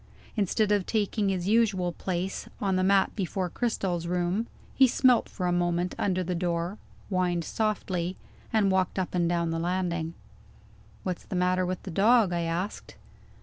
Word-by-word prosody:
Instead 210 0 +1
of 205 -3 +2
taking 210 -1 0
his 185 -1 -1
usual 205 -5 +2
place, 185 +2 -3
on 195 -2 +1
the 185 - +2
mat 195 0 +3
before 185 -2 -2
Cristel's 185 -8 -1
room, 180 +5 0 0.3
he 265 - +6
smelt 250 0 +3
for 185 - -4
a 175 - +2
moment 175 0 0
under 185 -2 +1
the 180 +1 -2
door 175 +2 -2 0.3
whined 180 -3 0
softly 185 -4 -1 0.4
and 210 -3 +3
walked 190 0 +1
up 185 -2 -2
and 175 -2 +2
down 170 -1 0
the 165 - -1
landing. 170 -2 -1 0.9
"What's 180 -2 -4
the 190 - -5
matter 180 0 +2
with 185 0 -3
the 190 - -6
dog?" 210 +1 +4
I 170 - 0
asked. 170 +4 -3
185 Hz, 165 wpm, -28 LUFS, 175-200 Hz, 0.9 s, he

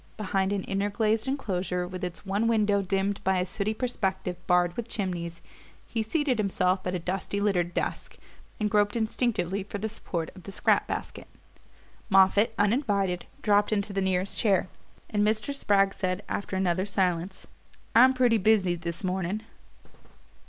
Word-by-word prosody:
Behind 195 -2 0
an 200 -2 -1
inner 195 +1 -1
glazed 215 +2 0
enclosure, 185 -9 -2
with 185 0 -7
its 180 +1 -5
one 200 +4 0
window 210 -3 +3
dimmed 195 +1 -1
by 190 0 +2
a 180 - +1
sooty 200 +3 -2
perspective 190 -7 -2
barred 175 -1 +3
with 235 -1 -4
chimneys, 175 -6 -4 0.4
he 225 - -2
seated 260 +1 0
himself 185 -2 +1
at 180 - -1
a - - +1
dusty 190 +3 -3
littered 185 -4 +1
desk, - - -3 0.4
and 215 - +1
groped 205 0 +2
instinctively 220 -4 0
for 205 +1 -6
the 215 +2 -2
support 175 -6 -4
of 185 - -11
the 195 - -9
scrap - - +2
basket. - - -5 0.8
Moffatt, 200 +3 +4
uninvited, 205 -5 +1 0.2
dropped 205 0 +3
into 200 -1 0
the 195 - 0
nearest 190 0 0
chair, 195 -4 +2 0.4
and 210 - -1
Mr. 215 +6 +1
Spragg 195 -7 +2
said, 185 0 -2
after 200 - -3
another 190 0 +1
silence: 185 -1 -1 0.5
"I'm 260 +3 +7
pretty 245 -3 +3
busy 200 -3 +3
this 170 +1 -5
morning." 185 +3 -2
195 Hz, 160 wpm, -27 LUFS, 185-215 Hz, 0.8 s, I'm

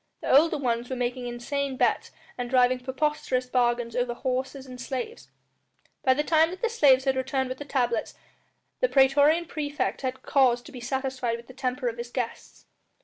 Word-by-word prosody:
The - - +2
older 315 +2 +5
ones 240 -3 -1
were 260 - -2
making 245 0 -2
insane 265 +3 -3
bets - - +1 0.3
and 245 -1 -4
driving 255 0 +3
preposterous 260 0 -1
bargains 240 -2 0
over 245 -1 0
horses 260 +2 -3
and 250 -1 -9
slaves. 265 - -5 0.7
By 260 -1 +4
the 295 - 0
time 320 +1 +4
that 370 +4 -9
the 465 - +2
slaves 275 - +4
had 265 -1 +2
returned 265 0 -1
with 255 - -5
the 290 - -6
tablets 245 -5 -1 0.6
the - - +2
praetorian 285 +5 +4
praefect 295 -2 -3
had 260 -1 -4
cause 250 -3 +3
to - - -12
be 250 - -9
satisfied 260 -2 -2
with 235 - -13
the 255 - -13
temper 255 0 -2
of 235 0 -3
his 235 0 -5
guests. 245 -2 -5
260 Hz, 185 wpm, -26 LUFS, 245-280 Hz, 0.7 s, older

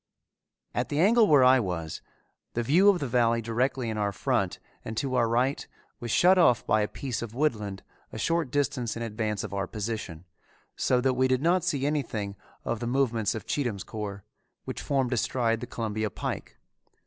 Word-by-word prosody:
At - - -1
the 145 - -1
angle 220 +5 +5
where 145 -6 +6
I 130 +1 +6
was, 85 -7 -4 0.5
the 120 - 0
view 175 - +5
of 200 - +4
the 140 - -3
valley 115 -1 +2
directly 120 +3 -1
in 110 -1 -2
our 100 -1 0
front 95 - -1 0.3
and 110 - -6
to 135 0 -1
our 120 -3 +2
right 125 +4 0 0.3
was 120 - -6
shut 180 - +5
off 125 -10 +4
by 110 - +3
a 105 - +1
piece 130 0 -4
of 115 -1 -6
woodland 105 -9 -1 0.3
a - - -7
short 165 -4 0
distance 130 -4 -1
in 115 - -3
advance 110 -2 -2
of 105 -3 -6
our 100 -1 -2
position, 105 -6 -5 0.5
so 125 -1 +2
that 130 0 +2
we 130 +1 +2
did 130 +1 +1
not 175 +1 +3
see 140 -2 0
anything 115 -9 -2 0.3
of 115 - -2
the 120 - -3
movements 120 -5 +1
of 110 - -6
Cheatham's 120 -9 -2
corps, 100 -3 -6 0.4
which - - -5
formed 135 -3 0
astride 115 0 0
the - - -6
Columbia 110 -2 -2
Pike. - - -5
120 Hz, 190 wpm, -27 LUFS, 110-135 Hz, 0.5 s, where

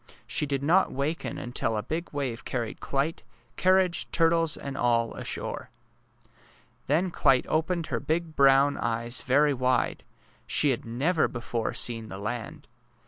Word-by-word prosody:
She 150 - 0
did 140 -1 -2
not 175 +6 +3
waken 145 +5 -3
until 120 -2 -1
a 105 - -2
big 165 +2 -4
wave 135 -5 -3
carried 120 -4 -4
Clyte, 145 +5 -2 0.3
carriage, 185 -1 +2
turtles, 165 -1 +2
and 140 -1 -6
all 115 -2 +1
ashore. - - -5 1.2
Then 170 +6 +1
Clyte 130 -5 +3
opened 165 +2 0
her - - +1
big 160 0 -2
brown 140 +1 +5
eyes 120 +1 -1
very 145 +3 +3
wide. 130 0 0 0.4
She 145 - +3
had 120 - -3
never 145 +9 +1
before 120 -1 -3
seen 115 -2 +1
the 95 - -6
land! 105 +3 -5
140 Hz, 140 wpm, -27 LUFS, 120-160 Hz, 1.2 s, brown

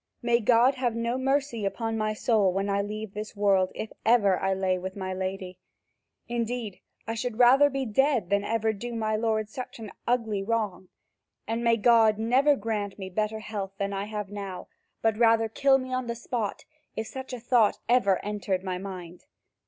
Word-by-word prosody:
May 235 0 +3
God 240 +3 +4
have 250 -3 -1
no 235 +1 -1
mercy 270 -4 0
upon 225 +3 -2
my 215 -1 -1
soul 210 -4 +2
when 195 +2 -1
I 200 0 +1
leave 210 0 -5
this 215 +1 -6
world, 195 -2 +2
if 220 - -5
I - - +1
ever 195 -4 +2
lay 185 -1 0
with 185 +1 -6
my 190 -1 -4
lady! 185 -1 -5 0.7
Indeed, 235 -3 -3 0.3
I 225 - -3
should 230 0 -3
rather 260 +4 +6
be 270 -1 -2
dead 240 -4 +1
than 200 0 +2
ever 220 0 0
do 235 +3 -6
my 215 -1 0
lord 215 -1 0
such 250 +4 -7
an 220 -4 -8 0.2
ugly 225 -4 0
wrong, 205 -3 -2 0.6
and 230 +1 -2
may 230 -1 +4
God 225 -1 +5
never 255 +6 +3
grant 205 -3 -3
me 190 -2 -7
better 215 +3 -1
health 205 -3 -5
than 200 0 -2
I 195 +1 -2
have 210 -1 -5
now 195 -3 -6 0.3
but 225 -1 +1
rather 225 -1 +4
kill 270 +4 +3
me 255 -1 -5
on 255 -1 -1
the 235 - -2
spot, 235 -3 -4 0.3
if 220 - -3
such 265 +4 -7
a 250 - -5
thought 235 -2 +3
ever 230 -6 +4
entered 200 -3 -2
my 185 -1 -3
mind! 180 -3 -8
220 Hz, 190 wpm, -27 LUFS, 200-235 Hz, 0.7 s, rather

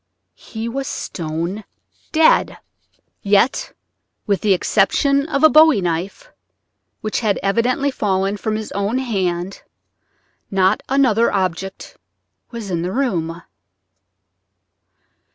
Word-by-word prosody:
He 225 0 -6
was 270 +3 -4
stone 170 +5 -4 0.5
dead. 315 0 +3 0.6
Yet 205 +6 +1 0.5
with 200 -3 0
the 210 - +1
exception 275 - +2
of 280 -3 -1
a - - +10
bowie 310 -6 +6
knife, 185 - -4 0.7
which 215 -1 -2
had 215 -4 0
evidently 245 +7 +1
fallen 195 -3 -1
from 215 +2 -2
his 215 0 -5
own 200 +5 -1
hand, 190 -7 -2 0.9
not 195 +1 +2
another 255 -4 +3
object 190 0 -3 0.5
was 225 -5 -7
in 170 -2 -1
the 180 +2 -3
room. 175 -10 -2
205 Hz, 105 wpm, -19 LUFS, 190-255 Hz, 0.9 s, a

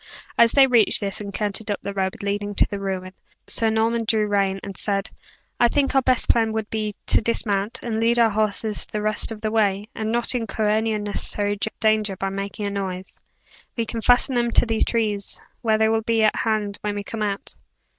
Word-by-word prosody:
As 235 -1 +5
they 275 -1 +7
reached 240 -5 +4
this, 200 0 -2
and 200 -1 -6
cantered 210 +1 -2
up 205 - -1
the 200 - -4
road 190 0 -3
leading 205 0 -2
to - - +3
the 200 - -5
ruin, 190 -1 -4 0.3
Sir 225 - +1
Norman 225 +1 +1
drew 220 -1 +2
rein, 195 -2 0
and 195 -1 -7
said: 200 0 -1 0.5
"I 240 - +6
think 275 +3 +1
our 270 - +4
best 255 -1 +2
plan 225 -2 +2
would 220 -1 -4
be, 215 -2 -2
to - - +4
dismount, 210 -2 0
and 225 -2 -2
lead 235 +1 +3
our 230 -2 +4
horses 215 0 0
the 210 - -4
rest 215 +1 +1
of 215 -1 -7
the 215 - -2
way, 205 -1 +1
and 220 0 -3
not 235 +2 +1
incur 225 -3 -1
any 220 +1 +1
unnecessary 205 0 0 0.2
danger 215 -3 +1
by 195 +1 -3
making 200 +2 -5
a 200 - -2
noise. 190 -2 -5 0.6
We 230 - 0
can 225 +1 -4
fasten 245 +3 +4
them 240 -1 +1
to - - +3
these 225 -1 +1
trees, 210 -4 -1 0.2
where 220 -3 +2
they 220 0 +3
will 225 0 +1
be 225 0 +1
at 215 - +3
hand 215 -2 -1
when 210 -1 -3
we 205 - -4
come 220 +2 -6
out." 200 -2 -3
215 Hz, 215 wpm, -23 LUFS, 200-225 Hz, 0.6 s, they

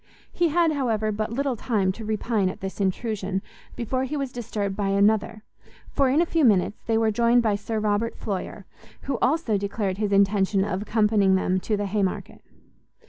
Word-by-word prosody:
He 345 - +2
had, 330 +1 +2
however, 225 -7 0
but 215 +1 -3
little 270 +1 -1
time 205 -5 0
to 220 +4 -9
repine 215 -2 0
at - - -7
this 190 +1 -5
intrusion, 195 -1 -2 0.3
before 255 +3 -2
he 295 +3 -3
was 275 -2 -3
disturbed 210 -5 -3
by 205 -1 -1
another, 210 +2 +1 0.5
for, 275 -2 +2
in 295 +6 +3
a - - -1
few 330 -2 0
minutes, 205 -4 +2
they 225 -1 +2
were 225 -1 +2
joined 235 +2 +3
by 215 -2 +2
Sir 215 +2 -4
Robert 215 +2 0
Floyer, 200 0 -5 0.4
who 270 -3 -2
also 260 -8 +1
declared 200 -1 -2
his 210 -2 -1
intention 195 0 +3
of 195 -2 -2
accompanying 210 -3 +2
them 185 0 +1
to 210 +3 -1
the 205 - -2
Haymarket. 195 -1 -2
215 Hz, 185 wpm, -24 LUFS, 200-235 Hz, 0.5 s, in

